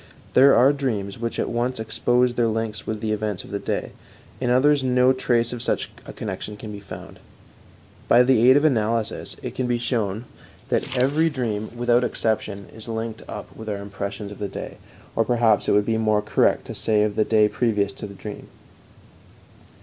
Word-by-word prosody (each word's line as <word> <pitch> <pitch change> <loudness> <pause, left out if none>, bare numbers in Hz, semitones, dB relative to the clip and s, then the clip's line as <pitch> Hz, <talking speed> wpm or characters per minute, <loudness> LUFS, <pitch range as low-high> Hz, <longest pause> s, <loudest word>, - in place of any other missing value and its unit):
There 135 +2 +7
are 135 +4 +6
dreams 110 -8 -3
which 115 0 -3
at - - 0
once 120 +1 -1
expose 120 +2 +1
their 120 -1 +1
links 110 -1 -3
with 110 -1 -3
the 110 -1 -1
events 105 -3 -2
of - - -12
the 100 - -2
day; - - -3 0.5
in 125 - -1
others 135 +3 +4
no 125 0 +4
trace 120 -2 +1
of 120 - -5
such - - -1 0.2
a - - -6
connection 105 0 -6
can 105 +1 -8
be 105 - -7
found. 100 - -10 0.9
By 120 +1 +6
the 125 -1 +5
aid 130 - +7
of 145 - +2
analysis 115 -5 0
it - - -4
can 130 - -2
be 120 -1 +1
shown 115 -2 -2 0.4
that 130 - -1
every 145 +6 +3
dream, 115 -7 -3
without 120 0 +3
any - - +2
exception, 105 -3 -2
is 110 0 -11
linked 110 0 -4
up - - -8
with 110 0 -7
our 105 - -2
impression 100 +1 -6
of 105 - -10
the 105 - -2
day, - - -7 0.4
or 115 - +3
perhaps 115 -2 +2
it - - +3
would 105 0 +3
be 110 0 0
more 110 -1 +2
correct 105 - +2
to - - -6
say 105 -2 +2
of 105 -1 0
the 110 - +3
day 105 -1 +4
previous 105 -4 0
to - - -7
the 100 - -11
dream. 105 +1 -8
115 Hz, 200 wpm, -23 LUFS, 105-125 Hz, 0.9 s, There